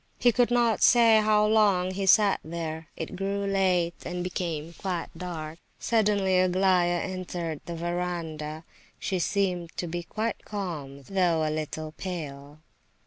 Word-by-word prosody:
He 245 - +4
could 245 0 +2
not 240 -2 +2
say 230 -3 +6
how 210 0 +4
long 205 -4 +3
he 195 +1 -3
sat 205 +1 +5
there. 160 -1 -5
It 160 +3 -5
grew 200 +1 -2
late 185 -3 +1
and 175 0 -4
became 170 -3 -3
quite 180 -2 -3
dark. 165 -2 -6 0.2
Suddenly 205 -4 +2
Aglaya 185 -1 +3
entered 175 -4 -4
the 170 - -4
verandah. 165 -3 -3 0.3
She 190 -2 -2
seemed 180 -2 -1
to - - -2
be 175 +1 -3
quite 220 +6 -3
calm, 155 -9 -5
though 170 -2 +1
a 155 - -1
little 155 0 -4
pale. 150 -4 -7
180 Hz, 140 wpm, -27 LUFS, 165-195 Hz, 0.3 s, say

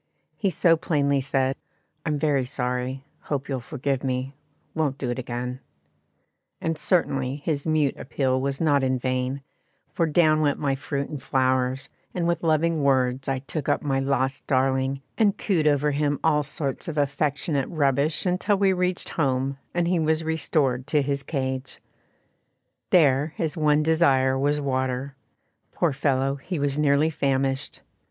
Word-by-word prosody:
He 200 - 0
so 170 -2 +4
plainly 140 -4 +1
said, 135 0 0 0.5
"I'm 150 -1 +1
very 145 -3 +1
sorry 125 +1 -3 0.2
hope 140 -2 -2
you'll 135 -2 -2
forgive 135 +1 -3
me; 130 +1 -2 0.4
won't 150 -4 -1
do 130 -3 -2
it 120 - -3
again"; 125 +1 -4 1.0
and 165 0 -1
certainly 140 -5 0
his 145 0 -3
mute 155 -3 +2
appeal 130 -1 0
was 135 0 -2
not 145 -4 +3
in 130 0 +1
vain, 130 +2 -2 0.5
for 165 +2 +1
down 155 -1 +3
went 145 -2 +2
my 140 -2 0
fruit 140 +1 -3
and 150 -3 -6
flowers, 130 0 0 0.3
and 175 -2 0
with 170 -1 0
loving 160 0 +2
words 130 -1 +1
I 135 - 0
took 150 -1 -3
up 145 - +1
my 135 -2 0
lost 135 0 -1
darling, 135 0 +1 0.2
and 210 -3 +3
cooed 170 -7 +1
over 145 0 +3
him 145 0 0
all 150 -2 +3
sorts 145 +2 -4
of 160 -2 -4
affectionate 145 0 0
rubbish 145 0 +1
until 190 +3 +1
we 195 -1 +3
reached 180 0 0
home 135 -2 -1
and 175 -1 0
he 175 -1 +2
was 160 0 +1
restored 145 -5 0
to 145 0 +2
his 140 0 -1
cage. 130 -2 -3 1.1
There 150 -3 +4
his 160 -3 -1
one 150 -2 +3
desire 140 -5 +3
was 145 +2 +1
water. 130 -1 -2 0.6
Poor 170 -5 0
fellow! 135 0 0
he 175 +6 -5
was 145 0 0
nearly 150 +1 +3
famished. 135 -2 -1
140 Hz, 155 wpm, -25 LUFS, 130-155 Hz, 1.1 s, so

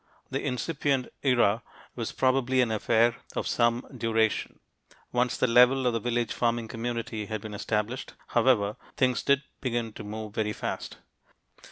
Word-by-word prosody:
The - - -2
incipient 135 0 -1
era 120 -5 +3 0.3
was 115 -2 -3
probably 130 0 +2
an 120 -3 +1
affair 115 +2 +3 0.2
of - - -1
some 120 0 +2
duration. 110 -2 0 0.5
Once 125 0 +1
the - - +2
level 125 +2 +5
of 125 - +2
the 115 - 0
village 120 0 -1
farming 115 -1 0
community 115 -2 -3
had 110 +1 -3
been 105 +1 -8
established, 105 +4 -2
however, 115 -4 +3 0.2
things 125 -1 +2
did 140 +1 +3 0.2
begin 120 -4 -2
to - - -8
move 105 0 -6
very 105 0 -1
fast. - - -5
120 Hz, 150 wpm, -28 LUFS, 110-125 Hz, 0.5 s, level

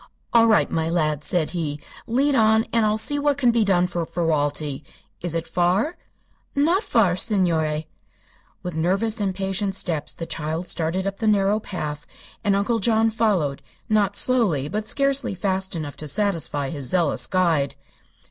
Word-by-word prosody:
"All 230 -1 +6
right, 220 -2 +3
my 160 0 0
lad," 155 -3 0
said 170 -2 0
he. 155 -4 -3 0.3
"Lead 275 +5 +2
on, 220 -2 +4
and 230 -2 +3
I'll 210 0 +1
see 290 +7 +1
what 285 -1 +1
can 250 -4 +3
be 230 -1 +2
done 180 -3 +3
for 175 -1 -2
Ferralti. 150 -4 -1 0.4
Is 170 -2 -2
it 165 - -2
far?" 185 - +1 0.6
"Not 330 +8 +3
far, 205 - +2
signore." 165 -6 +1 0.8
With 180 - -4
nervous, 195 +8 0
impatient 195 0 -1
steps 165 -6 -2
the 165 - -5
child 160 +2 -4
started 170 +3 -1
up 195 0 -3
the 220 - -2
narrow 205 0 +3
path 150 -7 -5 0.4
and 200 -2 +2
Uncle 215 +4 +1
John 225 +1 +2
followed 195 -11 0 0.3
not 205 -2 +2
slowly, 200 - +1
but 215 +6 -3
scarcely 275 -3 0
fast 190 0 -1
enough 150 -3 -5
to 155 - -6
satisfy 155 -6 -1
his 140 -5 -2
zealous 170 -3 +2
guide. 170 -7 +1
190 Hz, 160 wpm, -23 LUFS, 160-220 Hz, 0.8 s, All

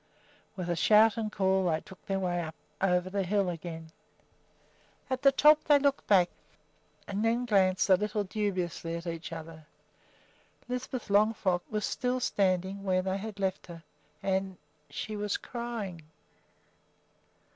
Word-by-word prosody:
With 175 -2 -2
shout 215 0 +6
and 220 -2 -3
call 190 -2 +2
they 160 -1 +1
took 190 - -15
their 195 - 0
way 175 -2 -1
up 160 -1 -6 0.3
over 180 -1 +2
the 200 +1 -1
hill 195 0 +1
again. 165 -1 -7 1.2
At 260 0 -1
the 275 -1 +6
top 300 +2 +5
they 290 - +6
looked 280 0 0
back 185 -4 +4 0.8
and 200 +2 -2
then 235 +2 +1
glanced 190 -5 +3
a 190 -2 +6
little 210 +1 -1
dubiously 185 -5 -2
at 170 +1 -6
each 165 -1 -5
other. 160 -1 -9 1.0
Lisbeth 250 -1 -4
Longfrock 200 -3 +3
was 210 -1 -1
still 250 -1 -1
standing 190 -3 0
where 185 -1 +1
they 190 +1 -1
had 210 -1 -7
left 190 -1 -2
her, 170 -2 -10 0.4
and 190 -1 -1 0.3
she 210 +9 -5
was 210 -1 -1
crying! 230 -8 -5
195 Hz, 145 wpm, -30 LUFS, 180-215 Hz, 1.2 s, shout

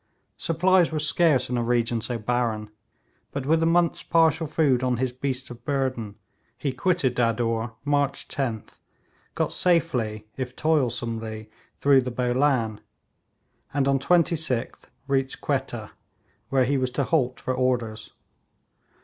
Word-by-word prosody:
Supplies 175 +1 +3
were 160 - -2
scarce 155 -2 +3
in 125 0 -1
a - - 0
region 120 -1 +1
so 120 +1 -3
barren, 110 -2 -1 0.6
but 140 -2 -4
with 160 +3 +3
a 165 - +3
month's 170 0 +2
partial 160 -1 +2
food 145 -5 +2
on 125 -1 +1
his 130 0 -1
beasts 130 0 -4
of 120 - -11
burden 130 -7 -2 0.4
he 140 -3 -2
quitted 155 -3 +1
Dadur 115 -1 0
March 145 -1 0
10th, 120 -6 -4 0.6
got - - -1
safely, 125 -12 +1
if 130 -1 -4
toilsomely, 115 -7 -1 0.3
through 140 -1 +5
the 125 - -3
Bolan, 125 -2 +1 0.9
and 140 -1 +2
on 140 0 +3
26th 160 -5 +1 0.2
reached 135 -1 -1
Quetta, - - -3 0.6
where 130 -2 +3
he 140 +1 +1
was 130 -1 0
to - - -1
halt 130 -7 0
for 130 - -2
orders. 120 -4 -1
130 Hz, 135 wpm, -25 LUFS, 120-145 Hz, 0.9 s, through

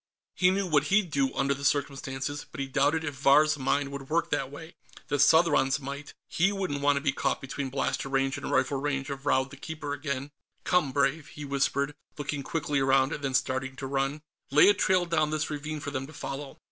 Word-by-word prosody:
He 180 - +4
knew 195 +1 +1
what 150 -5 +2
he'd 195 -2 +2
do, 135 -2 +1
under 140 0 +1
the 140 +1 -8
circumstances, 140 0 -2
but - - -9
he 140 - -1
doubted 145 +4 +1
if 145 -2 -3
Vahr's 145 +3 +4
mind 140 +1 0
would 140 -1 -7
work 170 +2 0
that 135 -1 0
way. 160 +4 -10 0.4
The 145 - 0
Southron's 145 -3 +4
might; 140 +1 -7
he 180 +4 +2
wouldn't 185 -8 -2
want 145 0 +3
to - - -1
be 140 -1 +2
caught 135 0 -1
between 135 0 -4
blaster 135 0 -2
range 135 0 +1
and 140 - -5
rifle 140 - +1
range 135 -1 -2
of 140 +1 -6
Raud 130 +1 +2
the 140 - -10
Keeper 150 0 -5
again. 140 -1 -4 0.3
"Come, 175 -7 +2
Brave," 140 +2 +1
he 150 - -8
whispered, 140 +1 0 0.2
looking 145 0 -3
quickly 145 0 -1
around 135 0 +3
and 145 - -6
then 135 -2 -1
starting 130 0 -1
to 135 - -6
run. 135 +2 -1 0.3
Lay 150 +7 +7
a - - +6
trail 185 -2 +2
down 155 -3 +1
this 155 0 -2
ravine 150 +1 -4
for 145 -1 -5
them 135 -1 -4
to 155 - -13
follow. 140 -1 -6
140 Hz, 215 wpm, -28 LUFS, 135-155 Hz, 0.4 s, Lay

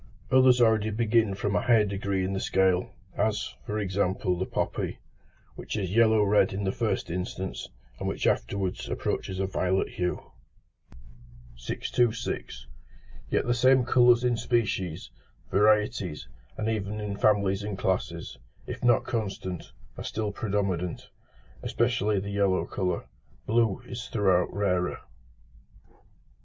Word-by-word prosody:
Others 130 -1 +6
already 110 -2 +4
begin 110 -1 +2
from 100 +1 -1
a - - +2
higher 115 -3 +4
degree 100 -1 -1
in 95 - -2
the 95 - -1
scale, 95 -2 +2 0.3
as, 105 0 0
for 105 - -2
example, 95 -2 0
the 95 +2 -3
poppy, - - -2 0.6
which - - -5
is 95 -3 -2
yellow 110 -2 +5
red 105 -1 +3
in 100 +1 -3
the 95 - +1
first 105 -5 -2
instance, 90 +1 -4 0.3
and - - -3
which - - -2
afterwards 95 -2 -1
approaches 95 - -2
a 95 - +1
violet 95 0 0
hue. 90 0 -3 1.2
626. 110 - -2 0.6
Yet - - +1
the 120 - +2
same 130 +1 +4
colours 120 -1 +5
in 120 -1 +2
species, 105 -8 -1 0.4
varieties, 105 - +2 0.3
and 110 - -2
even 105 -1 -2
in 105 -1 -3
families 100 -1 +2
and 100 -1 -4
classes, 85 -7 -2 0.3
if - - -7
not 120 -1 +4
constant, 95 -6 -4 0.3
are - - -5
still 105 -1 -2
predominant, 100 -5 -2 0.5
especially 110 -4 +1
the 100 +1 -5
yellow 100 -2 +1
colour: 90 -2 -2 0.4
blue 115 0 +1
is 120 0 -6
throughout 95 -5 +2
rarer. 90 -2 0
100 Hz, 130 wpm, -27 LUFS, 95-110 Hz, 1.2 s, Others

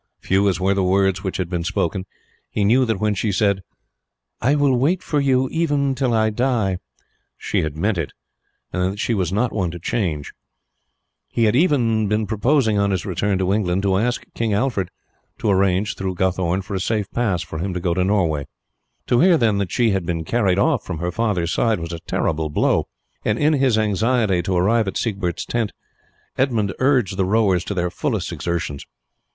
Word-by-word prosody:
Few 100 +1 +2
as 90 -2 -1
were 95 +1 +2
the 100 -1 0
words 95 +1 +2
which 95 - -3
had 95 - -2
been 85 -1 -2
spoken, 90 +2 -2 0.4
he 105 - -1
knew 125 +6 +4
that 110 -5 -1
when 105 -1 +1
she 105 +2 -1
said, 100 0 +1 0.8
"I 135 +5 +3
will 145 -3 +3
wait 160 +9 +1
for 150 - 0
you 130 -2 +2
even 145 -4 +1
till 130 -1 0
I 110 -1 +2
die," 110 -6 0 0.6
she - - -1
had 75 -1 -4
meant 100 +2 0
it, 80 - -3 0.6
and 90 +1 0
that 100 - -10
she 115 - 0
was 90 -5 0
not 110 +5 0
one 95 -5 0
to 85 - -7
change. 85 -6 -2 1.0
He 115 - 0
had 110 +1 +3
even 120 - +2
been 105 +1 0
purposing, 110 +1 +2
on 100 0 +2
his 95 -2 -1
return 100 +1 0
to 95 +1 +1
England, 95 -2 0
to 95 -1 +2
ask 120 +5 0
King 115 -2 -1
Alfred 105 -6 0 0.5
to 105 - 0
arrange 95 +1 +2
through 95 -1 -3
Guthorn 95 0 0
for 100 - -7
a 95 - -1
safe 105 +2 0
pass 105 -8 0
for 80 - -7
him 95 +3 -2
to - - -1
go 85 0 0
to 90 - +1
Norway. 85 -8 +1 0.6
To 120 - +2
hear, 175 +2 +5
then, 110 -6 +2
that 100 -3 -2
she 120 -3 +2
had 95 -2 0
been 85 -1 -2
carried 100 -3 +1
off 140 +2 +2
from 85 - -5
her 85 +2 -2
father's 95 -5 0
side 115 -5 +1
was 85 0 -5
a 85 - -5
terrible 80 -1 -1
blow, 75 - +1 0.4
and 105 - 0
in 150 +3 +3
his 135 -5 +2
anxiety 110 -2 +1
to 90 +1 -1
arrive 110 +4 +2
at 95 - -2
Siegbert's 95 -7 -2
tent 115 -3 -2 0.7
Edmund 115 -7 +1
urged 125 -8 +2
the 95 - +2
rowers 95 -3 +2
to 100 - -4
their 90 -1 -1
fullest - - -2
exertions. 85 -5 -3
100 Hz, 200 wpm, -21 LUFS, 90-115 Hz, 1.0 s, hear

